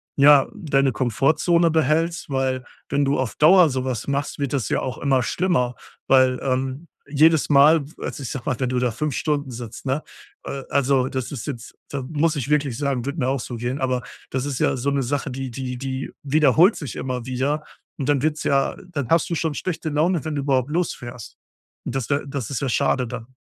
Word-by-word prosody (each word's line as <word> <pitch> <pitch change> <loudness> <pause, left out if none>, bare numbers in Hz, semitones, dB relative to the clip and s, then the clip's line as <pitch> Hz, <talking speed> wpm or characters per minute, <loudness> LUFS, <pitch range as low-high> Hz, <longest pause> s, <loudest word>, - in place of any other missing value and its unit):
ja, 140 -1 +7
deine 140 -9 +1
Komfortzone 150 - +2
behältst, 160 +2 +1
weil, 130 -1 -1 0.3
wenn 140 +1 +1
du 140 0 +1
auf 130 -3 -2
Dauer 175 +2 +6
sowas 130 -3 -3
machst, 140 +2 -2
wird 140 -2 -2
das 130 -7 -1
ja - - +1
auch 130 - -4
immer 135 -3 +2
schlimmer, 125 -3 0 0.3
weil, 130 -1 +4
ähm, 135 +4 -2 0.2
jedes 155 +2 +4
Mal 145 +2 +6
also, 140 - -5
ich 125 - -4
sage 130 -3 -6
mal, 130 - -2
wenn 130 -2 0
du 125 0 0
da 125 0 +1
5 140 +6 -2
Stunden 145 -3 -1
sitzt, 120 0 -8
ne, 135 +3 0 0.4
äh, 135 -1 -5
also, 135 -2 +2
das 130 0 -4
ist 130 -6 -5
jetzt 120 -6 -7
da 140 - -3
muss 155 +4 0
ich 140 -2 -3
wirklich 145 -4 +1
sagen, 140 -4 -1
würde 140 +4 -3
mir 125 - +1
auch 135 +1 0
so 120 0 -6
gehen. 120 +4 -3
Aber 130 -2 0 0.3
das 130 0 -1
ist 140 -3 -3
ja - - +2
so 130 +2 -1
'ne 140 -1 0
Sache, 140 +3 -2
die 130 0 -5
die 125 0 -5
die 130 +1 -4
wiederholt 155 - +4
sich 145 -7 -6
immer 125 -2 -4
wieder 135 +4 -1 0.4
und 140 0 -2
dann 145 -2 +2
wird's 155 0 0
ja 135 -1 +1
dann 145 -7 -3
hast 165 -2 +3
du 170 - -1
schon 160 -1 -1
schlechte 165 +1 -3
Laune, 155 +1 +1
wenn 155 - -2
du 145 - -1
überhaupt 135 -1 +1
losfährst, 130 -9 -4 0.5
und - - -4
das 135 -3 -2
wäre 140 0 0
das 135 -5 -4
ist 135 - -2
ja 135 - -1
schade 125 +1 +1
dann. 125 +2 -8
140 Hz, 210 wpm, -23 LUFS, 130-150 Hz, 0.5 s, ja